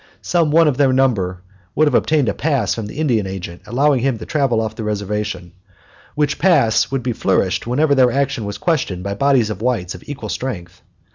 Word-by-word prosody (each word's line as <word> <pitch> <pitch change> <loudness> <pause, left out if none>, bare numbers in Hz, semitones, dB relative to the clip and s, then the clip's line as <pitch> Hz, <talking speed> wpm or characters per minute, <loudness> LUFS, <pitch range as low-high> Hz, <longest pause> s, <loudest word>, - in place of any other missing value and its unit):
Some 170 -3 +1
one 165 +2 +4
of 140 -4 +1
their 140 -2 +3
number 100 -9 0 0.3
would 155 - +4
have 145 - +1
obtained 150 0 +2
a 100 - +1
pass 135 - 0
from 110 -3 -5
the 105 - -10
Indian 120 -10 +1
Agent 90 -2 -7
allowing 135 +4 +2
him 130 -1 0
to 110 - -8
travel 135 -7 +1
off 110 -1 -2
the 110 - -6
reservation, 105 -3 -3 0.6
which 150 -1 0
pass 115 -11 +3
would 135 -2 -2
be 125 -1 -1
flourished 95 -1 0
whenever 145 +5 +2
their 130 -3 +4
action 135 -4 -1
was 100 0 -5
questioned 130 - -1
by 100 0 -3
bodies 125 -1 +2
of 105 -1 -6
whites 115 -8 -1
of 90 - -11
equal 145 -1 -6
strength. 90 -9 -5
120 Hz, 205 wpm, -19 LUFS, 100-140 Hz, 0.6 s, one